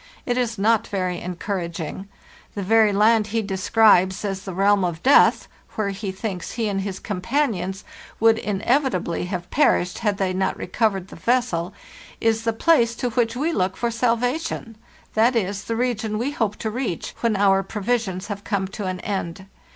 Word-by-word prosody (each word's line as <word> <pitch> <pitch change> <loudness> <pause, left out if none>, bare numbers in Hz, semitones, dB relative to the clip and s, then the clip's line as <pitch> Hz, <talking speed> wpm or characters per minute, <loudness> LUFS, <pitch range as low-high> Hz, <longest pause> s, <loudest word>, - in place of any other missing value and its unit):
It 245 - 0
is 240 -2 -1
not 220 +2 +2
very 185 -3 -2
encouraging. 180 0 -4 0.5
The 200 - -3
very 220 +2 +4
land 215 +1 +3
he 225 +1 -1
describes 195 -1 +3
as 195 -1 -4
the 190 - -5
realm 200 +1 +3
of 170 -2 -3
Death, 275 +2 +5 0.3
where 215 -2 -1
he 195 0 -4
thinks 190 -3 -5
he 225 -2 -1
and 195 -1 -1
his 190 -1 -4
companions 195 -2 -2 0.4
would 225 0 +4
inevitably 210 - 0
have 180 -1 -5
perished 180 -11 +2
had 210 -3 0
they 190 -2 0
not 190 +1 -1
recovered 195 -1 -1
the - - -10
vessel, 230 -8 0 0.5
is 225 0 +1
the 230 - +2
place 235 -1 +3
to 245 0 -2
which 235 +1 0
we 310 +6 0
look 185 -4 0
for 235 -1 -1
salvation; 235 +1 -1 0.4
that 230 +3 +3
is 200 -2 -1
the 230 - -2
region 225 -3 -1
we 250 +6 -1
hope 220 -7 -1
to 220 - -4
reach 235 -7 -3
when 230 -2 +1
our 195 -1 +4
provisions 205 -1 -2
have 205 -2 -6
come 195 -2 -1
to 200 +1 -6
an 185 -1 -4
end. 190 -2 -4
210 Hz, 175 wpm, -23 LUFS, 190-230 Hz, 0.5 s, Death